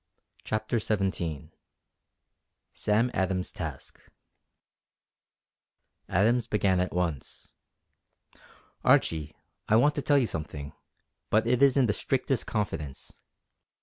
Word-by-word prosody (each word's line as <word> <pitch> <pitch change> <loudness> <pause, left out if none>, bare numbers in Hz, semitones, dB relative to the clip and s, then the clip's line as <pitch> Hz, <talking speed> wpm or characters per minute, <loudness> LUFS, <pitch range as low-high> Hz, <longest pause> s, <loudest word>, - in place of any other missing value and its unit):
CHAPTER 110 +2 -1
XVII 85 -8 -2 1.2
SAM 110 +4 +1
ADAMS'S 95 -1 -1
TASK 75 -6 -7 2.1
Adams 115 +5 +2
began 100 -4 +2
at 90 - 0
once: 85 -6 -4 1.3
"Archie 80 -2 +2 0.3
I 110 - +5
want 145 +6 +5
to 145 - -2
tell 145 +1 +3
you 135 - +3
something; 75 -6 -6 0.6
but 110 +1 +3
it 125 +2 +1
is 140 -1 +5
in 135 - +5
the 105 - +1
strictest 135 +3 -1
confidence. 75 - -4
105 Hz, 100 wpm, -28 LUFS, 85-120 Hz, 2.1 s, I